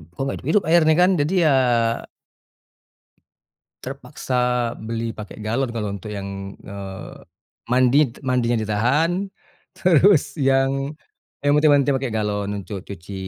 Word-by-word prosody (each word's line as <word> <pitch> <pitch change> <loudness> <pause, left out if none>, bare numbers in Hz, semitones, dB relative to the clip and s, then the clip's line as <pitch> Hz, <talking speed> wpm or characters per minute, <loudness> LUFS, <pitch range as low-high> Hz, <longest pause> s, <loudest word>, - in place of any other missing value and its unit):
kok, - - -23
enggak 135 - -2
hidup-hidup 170 +8 +1
airnya, 160 -2 +5
kan? 180 +2 +5
Jadi, 150 +6 0
ya 155 - +4 2.3
terpaksa 135 0 -7 0.5
beli 115 0 -4
pakai 105 -2 -9
galon. 120 +4 -1
Kalau 110 -3 -3
untuk 100 +2 -7
yang, 100 -1 -6
eee, 100 -1 -8 0.6
mandi 130 +3 +4
t - - -15
mandinya 120 -2 +1
ditahan. 150 - +1 0.5
Terus, 175 -4 +4
yang, 135 +2 +1 0.5
ya - - +3
mandi- 150 +1 +4
mandi 145 -1 +4
pakai 135 -1 -1
galon 105 -2 -2
untuk 100 -1 -6
cuci 100 -1 -10
130 Hz, 125 wpm, -22 LUFS, 105-145 Hz, 2.3 s, airnya